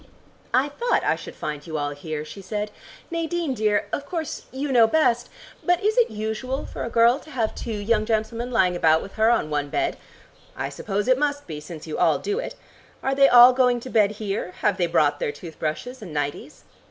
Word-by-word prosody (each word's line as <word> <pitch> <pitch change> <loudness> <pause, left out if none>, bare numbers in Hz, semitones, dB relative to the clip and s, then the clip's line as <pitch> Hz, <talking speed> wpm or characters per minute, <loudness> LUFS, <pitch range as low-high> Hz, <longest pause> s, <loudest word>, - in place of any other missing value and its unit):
"I 265 +3 +2
thought 475 +12 0
I - - +2
should - - -10
find 150 0 -5
you 160 -1 -3
all 145 -1 -2
here," 150 +1 -5
she 195 +6 -10
said. 210 +2 -4 0.4
"Nadine 335 -3 -1
dear, 210 -3 +1
of 285 - -3
course 325 -4 -4
you 275 +2 -3
know 235 -3 +6
best, 240 -4 +2 0.3
but 355 +1 +2
is 430 +1 +2
it 485 -2 +4
usual 220 +5 -3
for - - -6
a - - -3
girl 235 +3 +4
to 310 - -15
have 235 -7 -1
two - - -7
young 215 +1 0
gentlemen 230 +2 -1
lying 190 -7 +2
about 160 -2 +3
with 195 - -10
her 220 +1 +3
on 195 -10 +1
one 145 -1 -1
bed? 345 - -1 0.6
I - - -2
suppose 205 +1 -3
it 255 0 +4
must 285 -1 -1
be, 155 -2 -6
since 155 +1 -9
you 155 - -5
all - - +4
do 415 +3 -2
it. - - -5 0.5
Are 270 - +1
they 275 0 +6
all 245 +1 +9
going 250 -1 +3
to 255 - -8
bed 210 -2 +3
here? 200 -3 -4
Have 205 -3 +2
they 175 - +1
brought 150 -3 +2
their - - -1
tooth 160 +2 -11
brushes 235 +12 -4
and 190 -6 -8
nighties? 145 -1 -4
220 Hz, 215 wpm, -24 LUFS, 175-265 Hz, 0.6 s, all